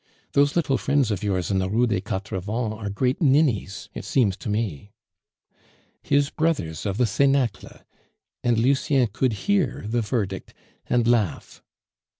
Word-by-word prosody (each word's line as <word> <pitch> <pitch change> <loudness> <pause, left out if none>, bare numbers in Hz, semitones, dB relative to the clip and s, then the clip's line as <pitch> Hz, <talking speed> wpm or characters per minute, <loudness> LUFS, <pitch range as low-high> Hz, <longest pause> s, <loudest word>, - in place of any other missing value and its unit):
"Those 145 +1 +3
little 150 -6 +1
friends 140 -5 +1
of 100 - -2
yours 95 -2 -1
in 95 - +2
the 95 0 -1
Rue 115 +5 +2
des 105 -6 0
Quatre 95 -2 -4
Vents 110 +4 -2
are 110 -2 -5
great 125 - -1
ninnies, 130 - +2
it - - -6
seems 110 -8 +1
to - - -6
me." 105 -3 -3 1.1
His 140 0 +1
brothers 125 - -1
of 100 0 -2
the 125 - +3
cenacle! 130 0 0 0.6
And 120 -2 +2
Lucien 135 +2 +2
could 130 +1 +1
hear 190 - +1
the 120 +2 0
verdict 105 -4 -3 0.3
and 120 -1 +2
laugh. 115 -7 0
115 Hz, 155 wpm, -24 LUFS, 100-135 Hz, 1.1 s, Those